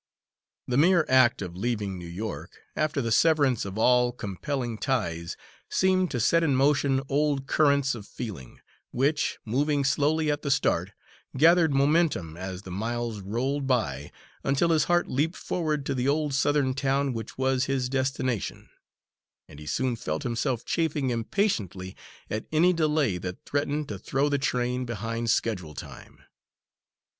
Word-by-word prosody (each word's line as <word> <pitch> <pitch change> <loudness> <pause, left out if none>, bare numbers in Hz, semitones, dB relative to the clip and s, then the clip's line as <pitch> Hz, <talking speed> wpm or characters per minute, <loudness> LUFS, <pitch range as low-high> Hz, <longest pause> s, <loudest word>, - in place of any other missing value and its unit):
The 125 - 0
mere 170 0 +5
act 130 -5 +4
of 90 -2 -7
leaving 105 -3 -2
New 85 - -8
York, 100 +6 -6 0.2
after 155 -3 0
the 115 - -2
severance 140 -5 +3
of 100 +1 -6
all 125 +2 +4
compelling 120 +2 -4
ties, 85 -11 -2 0.3
seemed 185 -1 +2
to 125 - -2
set 165 +9 +3
in 150 -5 +2
motion 135 0 +2
old 140 -1 0
currents 140 -2 +2
of 110 -4 -8
feeling, 95 - -8 0.3
which, 145 +4 0
moving 140 +5 +1
slowly 150 +3 +2
at 145 0 -2
the 140 - -3
start, 95 -8 +1 0.4
gathered 165 +2 +5
momentum 140 - +2
as 95 +1 -6
the 95 - -9
miles 115 +3 -3
rolled 130 +8 -2
by, 75 - -1 0.3
until 140 +5 +2
his 155 -2 +3
heart 175 0 +2
leaped 155 +7 0
forward 155 -5 -2
to 140 - -1
the 130 0 -1
old 150 0 +1
Southern 140 -1 +2
town 140 0 0
which 115 -1 -7
was 130 0 +1
his 135 -2 -1
destination, 130 -4 -2 0.8
and 70 - -13
he 75 - -10
soon 130 +5 0
felt 80 -8 -4
himself 120 +1 -2
chafing 150 -5 0
impatiently 110 - -1 0.3
at 110 - -4
any 170 +4 +4
delay 150 - +1
that 90 +1 -7
threatened 145 +1 -1
to 100 -3 -5
throw 135 +8 0
the 145 -1 +1
train 125 -1 -1
behind 115 0 -3
schedule 90 -9 -1
time. - - -11
130 Hz, 150 wpm, -27 LUFS, 110-145 Hz, 0.8 s, mere